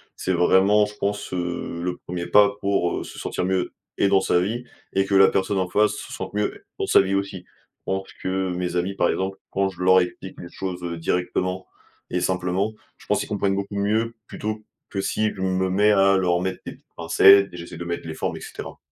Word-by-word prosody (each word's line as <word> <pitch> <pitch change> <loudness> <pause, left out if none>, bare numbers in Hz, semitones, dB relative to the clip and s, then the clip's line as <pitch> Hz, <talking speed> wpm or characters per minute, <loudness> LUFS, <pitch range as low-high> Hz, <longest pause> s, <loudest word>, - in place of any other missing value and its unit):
C'est 95 - -1
vraiment 95 +4 +4
je 105 - -9
pense, 100 -1 -3
heu, 85 -1 -3
le 90 0 -2
1er 85 -1 -4
pas 100 +2 +5
pour 100 -3 0
se - - -10
sentir - - -2
mieux, 95 -1 -1 0.2
et - - +3
dans 100 -1 +4
sa 90 - +2
vie, 110 +7 -2 0.3
et 95 0 +2
que 100 - 0
la 95 0 +8
personne 95 +1 0
en 90 - -1
face 105 +2 +3
se - - -8
sente 95 - -6
mieux 105 0 -2
dans - - 0
sa - - +6
vie 95 0 0
aussi. 100 -2 -3
Je - - -35
pense 95 0 -2 0.2
que 95 0 -1
mes 90 0 -3
amis, 90 +2 0
par 85 - +2
exemple, 95 +1 -2
quand 100 0 +1
je 90 -2 -11
leur 95 0 +6
explique 90 +1 -6
les 85 - -8
choses 90 -2 -5 0.2
directement 90 +2 -1 0.4
et 90 - 0
simplement, 95 +3 0 0.2
je - - -18
pense - - +2
qu'ils - - -3
comprennent 100 -2 0
beaucoup 100 +1 -4
mieux. 110 +3 0
Plutôt 110 0 -5 0.3
que 100 - -2
si 110 +2 0
je 95 - -8
me 95 0 0
mets 105 +3 +4
à 95 -1 +5
leur 90 -2 +2
mettre 95 0 -2
des - - -6
petites - - -23
pincettes 100 +4 +6
et - - -8
j'essaie 85 -1 -8
de 85 - -6
mettre 85 -1 -4
les 80 - -4
formes - - -3
et - - -10
cetera. - - -8
95 Hz, 225 wpm, -23 LUFS, 90-100 Hz, 0.4 s, la